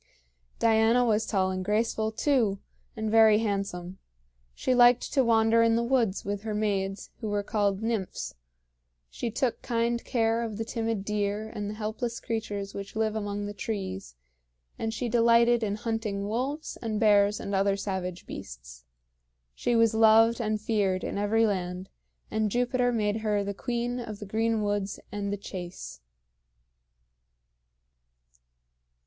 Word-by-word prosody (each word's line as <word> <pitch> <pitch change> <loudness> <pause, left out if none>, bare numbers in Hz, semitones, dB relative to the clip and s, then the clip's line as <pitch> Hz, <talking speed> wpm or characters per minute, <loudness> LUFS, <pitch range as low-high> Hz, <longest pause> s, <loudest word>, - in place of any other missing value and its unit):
Diana 225 +2 +4
was 220 -1 +1
tall 190 -3 +1
and 185 0 -3
graceful, 220 +2 0
too, 230 -4 +1 0.4
and 220 -1 -2
very 220 -1 +6
handsome. 195 -4 -3 0.6
She 255 - 0
liked 245 0 +5
to 270 - +4
wander 225 -1 +4
in 230 0 +4
the 235 - +1
woods 235 -5 +1
with 200 0 -3
her 215 -1 -4
maids, 195 -2 -2
who 220 - -4
were 205 0 -1
called 200 -1 0
nymphs; 225 -5 -3 0.8
she 235 - -3
took 240 +2 -1
kind 235 0 0
care 230 -2 +1
of 220 -3 -4
the 225 - -3
timid 225 -3 -2
deer 210 +1 -1
and 205 -1 -5
the 210 - -5
helpless 225 +2 -3
creatures 205 -3 -4
which 200 +1 -7
live 220 0 0
among 205 -1 -3
the 205 - -5
trees; 190 - -5 0.6
and 225 - -1
she 240 +2 -3
delighted 235 +1 +4
in 205 -2 -1
hunting 215 -2 -3
wolves 265 +8 -3
and 220 -2 -2
bears 205 -1 +4
and 200 - -5
other 195 0 +2
savage 185 -3 -4
beasts. - - -10 0.7
She 240 - 0
was 230 -1 +4
loved 225 +1 +5
and 215 -1 -1
feared 205 -4 0
in - - -3
every 220 +2 +3
land, 185 -2 -2 0.4
and 220 0 +1
Jupiter 245 +2 +1
made 215 -2 0
her 210 -2 0
the 200 0 -3
queen 240 +3 -2
of 220 -3 -6
the 205 - -8
green 220 +1 0
woods 205 -1 -2
and 200 -1 -3
the 205 - -2
chase. 175 - -8
215 Hz, 150 wpm, -28 LUFS, 200-230 Hz, 0.8 s, very